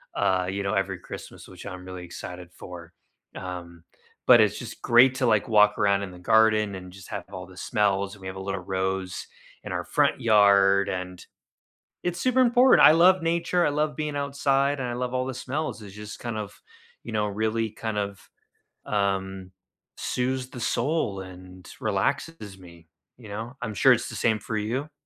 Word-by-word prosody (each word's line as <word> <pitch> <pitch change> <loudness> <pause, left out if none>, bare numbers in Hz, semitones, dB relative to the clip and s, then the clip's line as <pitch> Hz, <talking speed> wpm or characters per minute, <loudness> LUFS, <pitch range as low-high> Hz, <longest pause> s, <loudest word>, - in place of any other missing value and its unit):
uh, 95 -1 +1
you 100 +1 -3
know, 95 - -1
every 95 -1 -1
Christmas, - - -10
which - - -12
I'm 90 -2 -7
really 90 -1 -8
excited 90 +1 -9
for, 85 -1 -11 0.4
um, 85 -2 -7 0.4
but 120 -2 +9
it's 105 -1 +3
just 120 -1 -8
great 125 +2 +5
to 130 - 0
like 110 -1 +2
walk 105 -1 +5
around 100 -1 +2
in 95 - -6
the 90 - -12
garden 110 0 +3
and 90 -1 -9
just 95 -1 -13
have 100 -4 -5
all 90 0 -6
the 95 0 -15
smells, 100 -3 0
and 100 - -18
we 95 - -7
have 95 0 -6
a - - -5
little 95 0 -3
rose 95 0 -3 0.4
in - - -7
our - - -2
front - - +1
yard 100 -3 +5
and 90 -1 -5 0.8
it's 175 -1 -2
super 255 0 +2
important. 250 +1 +6
I - - +10
love 180 +2 +5
nature. 170 +1 +1
I - - +2
love 150 0 -1
being 150 -1 -3
outside, 140 0 +1
and 130 - -2
I - - -3
love 125 +1 -3
all 130 0 0
the 130 - -4
smells. 130 -2 -4
It's 100 -1 -11
just 105 0 -9
kind 120 -2 -4
of, 105 -2 -7 0.4
you - - -8
know, 105 -1 +1
really 110 +2 -1
kind 110 0 -5
of, 100 -1 -5 0.6
um, 95 -2 -2 0.5
soothes 130 0 -2
the 125 - -9
soul 120 -8 -1
and 90 -1 -12
relaxes 105 0 -2
me, 85 -2 -15 0.3
you 115 -4 -13
know? 110 +5 -6
I'm 115 -4 -4
sure - - +6
it's - - -2
the - - -7
same 110 -2 +2
for 110 +2 -4
you. 130 +8 -3
105 Hz, 190 wpm, -26 LUFS, 95-125 Hz, 0.8 s, I